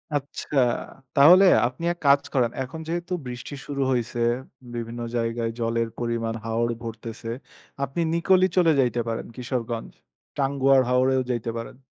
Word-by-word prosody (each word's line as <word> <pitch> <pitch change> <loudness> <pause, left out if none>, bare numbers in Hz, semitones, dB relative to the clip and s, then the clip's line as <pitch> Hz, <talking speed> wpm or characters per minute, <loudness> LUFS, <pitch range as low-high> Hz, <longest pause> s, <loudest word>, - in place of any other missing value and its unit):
আচ্ছা। 145 +1 -3 0.6
তাহলে 175 +8 +8 0.2
আপনি 125 +6 -9
এক - - -20
কাজ 140 0 +6
করেন। 125 -4 +2
এখন 130 +5 -8
যেহেতু 175 +2 -3
বৃষ্টি 125 +3 -7
শুরু 140 -1 -3
হইছে, 120 -1 -1 0.5
বিভিন্ন 120 0 -5
জায়গায় 115 0 -1
জলের 115 0 0
পরিমাণ, 115 -1 -1
হাওর 115 +1 0
ভরতেছে। 115 0 -7 0.5
আপনি 140 +5 -2
নিকলি 185 +2 +4
চলে 170 -3 +5
যাইতে 120 -2 +2
পারেন, 115 -1 -3
কিশোরগঞ্জ। 120 -2 -4 0.5
টাঙ্গুয়ার 135 -1 +3
হাওরেও 130 +1 +3
যাইতে 120 -1 -2
পারেন। 115 - -7
125 Hz, 135 wpm, -25 LUFS, 115-140 Hz, 0.6 s, তাহলে